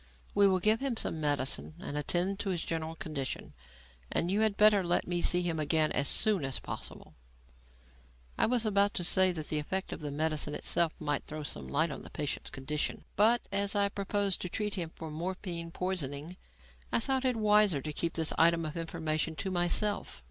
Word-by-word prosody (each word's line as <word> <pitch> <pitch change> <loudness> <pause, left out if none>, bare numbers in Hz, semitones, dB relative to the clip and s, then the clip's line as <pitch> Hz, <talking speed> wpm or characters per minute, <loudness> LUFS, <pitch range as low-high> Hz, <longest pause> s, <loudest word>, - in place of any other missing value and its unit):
"We 200 0 +5
will 190 -1 +2
give 215 +4 +3
him 270 -4 -2
some 160 - -1
medicine 145 +1 0
and 180 -6 -6
attend 175 +6 0
to 200 - -3
his 175 -3 -1
general 160 0 -4
condition, 155 -7 -5 0.6
and 175 - 0
you 205 +2 +2
had 215 -2 +1
better 210 -2 +6
let 175 0 +1
me 175 0 -1
see 180 +1 +4
him 165 -2 -1
again 155 +1 +2
as 140 - +1
soon 210 -7 +2
as 135 -1 -1
possible." - - -8 1.2
I - - +2
was 240 -1 +1
about 200 -1 +3
to 180 - -2
say 185 +2 +5
that 155 -4 -4
the 155 - +1
effect 190 +6 -3
of - - -7
the 150 - -5
medicine 150 0 0
itself 170 -2 +1
might 145 -2 -2
throw 155 0 -6
some - - -5
light 155 +3 +1
on - - -7
the - - -11
patient's 145 -2 -3
condition, 145 +3 -3
but, 225 +4 +5
as 200 +1 +2
I 200 0 +3
proposed 200 -1 -1
to 180 - -4
treat 210 +2 -2
him 175 -5 -3
for 160 -1 -9
morphine 170 +1 -4
poisoning, 165 -3 -4 0.6
I - - +3
thought 265 +2 0
it 255 -2 +1
wiser 210 -6 +4
to 150 +2 -5
keep 165 +2 -1
this 160 -1 0
item 165 0 +4
of 155 +1 -5
information 160 -1 -2
to 190 +4 -4
myself. 180 - 0
175 Hz, 200 wpm, -31 LUFS, 155-200 Hz, 1.2 s, better